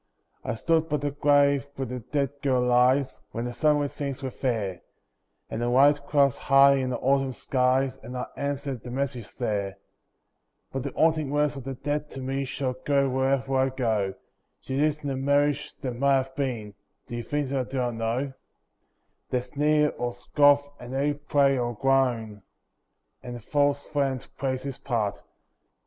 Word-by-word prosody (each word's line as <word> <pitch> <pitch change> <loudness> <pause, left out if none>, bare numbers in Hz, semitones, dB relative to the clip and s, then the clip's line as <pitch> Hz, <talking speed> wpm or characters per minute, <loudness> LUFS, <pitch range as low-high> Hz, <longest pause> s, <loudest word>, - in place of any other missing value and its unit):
I - - -2
stood 160 +6 +1
by 150 - +1
the 145 0 -2
grave 140 -1 +3
where 135 - -3
the 125 0 -5
dead 135 +3 -1
girl 130 -3 +2
lies, 125 +2 +3
When 115 +1 -3
the 120 - -4
sunlit 145 0 +2
scenes 140 -1 -5
were 130 - -3
fair, 110 -9 -2 0.7
And 110 - -4
the 120 - +1
white 140 +3 +4
clouds 140 -3 +3
high 140 0 +6
in 130 -1 -1
the 125 - -1
autumn 135 -1 +1
skies, 130 +1 +1
And 125 +3 -7
I 125 - -2
answered 140 -3 -3
the 125 - -9
message 130 -3 -3
there. 100 -5 -2 0.9
But 135 - -3
the 140 +1 -4
haunting 155 -3 +2
words 145 0 +1
of 135 -2 -8
the 135 -1 -4
dead 145 +3 -3
to 135 - -8
me 135 +1 -2
Shall 130 0 -2
go 140 -1 +2
wherever 135 +1 +1
I 130 0 +3
go. 110 -7 -1 0.4
She 130 - -5
lives 150 +1 +1
in 145 - -2
the 135 - -1
Marriage 145 +2 +1
that 130 -3 -3
Might 140 +3 +3
Have 135 0 -1
Been— 120 -7 -3 0.3
Do 120 - -7
you 120 - -2
think 145 +2 -2
that 130 -2 -1
I - - -16
do 135 - -4
not 125 -1 0
know? 115 +4 -2 1.0
They 125 - 0
sneer 150 +4 +2
or 120 0 -1
scoff, 145 +3 +4
and 125 +2 -7
they 145 +2 +1
pray 140 -2 +2
or 120 -1 -2
groan, 120 -4 +1 0.8
And 125 0 -7
the - - -7
false 145 +4 +1
friend 135 -4 -1
plays 130 -1 -2
his 135 -2 -5
part. 110 -6 -1
135 Hz, 180 wpm, -26 LUFS, 125-145 Hz, 1.0 s, high